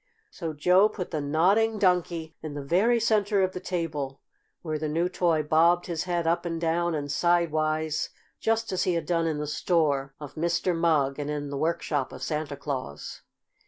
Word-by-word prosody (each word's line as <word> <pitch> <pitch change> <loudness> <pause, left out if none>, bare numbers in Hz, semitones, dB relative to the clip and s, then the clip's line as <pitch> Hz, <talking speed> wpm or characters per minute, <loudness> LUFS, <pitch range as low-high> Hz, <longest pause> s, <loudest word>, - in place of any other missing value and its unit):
So 165 -3 -5
Joe 180 +7 +4
put 190 -4 -6
the 155 -3 -1
Nodding 190 +10 +2
Donkey 175 -4 +1
in 155 -2 -6
the 145 - -4
very 205 +11 +3
center 210 -3 +2
of 185 - +1
the 180 - -6
table, 150 -7 -3 0.4
where 155 -2 -2
the 155 - -2
new 165 +4 +1
toy 170 -4 +1
bobbed 165 +3 +3
his 170 -2 -3
head 175 -2 -1
up 165 +1 +1
and 165 -1 -3
down 170 0 0
and 145 -1 -3
sidewise, 155 -2 +1 0.3
just 225 0 0
as 185 - 0
he 180 - +1
had 165 -2 -2
done 165 -1 +1
in 155 -2 -1
the 150 - -3
store 145 -2 0
of 145 -2 -8
Mr. 170 +2 0
Mugg 150 -5 +2
and 145 0 -3
in 145 -1 -3
the - - -3
workshop 150 -2 -1
of - - -8
Santa 150 -2 -3
Claus. 130 - -5
165 Hz, 190 wpm, -27 LUFS, 150-180 Hz, 0.4 s, Joe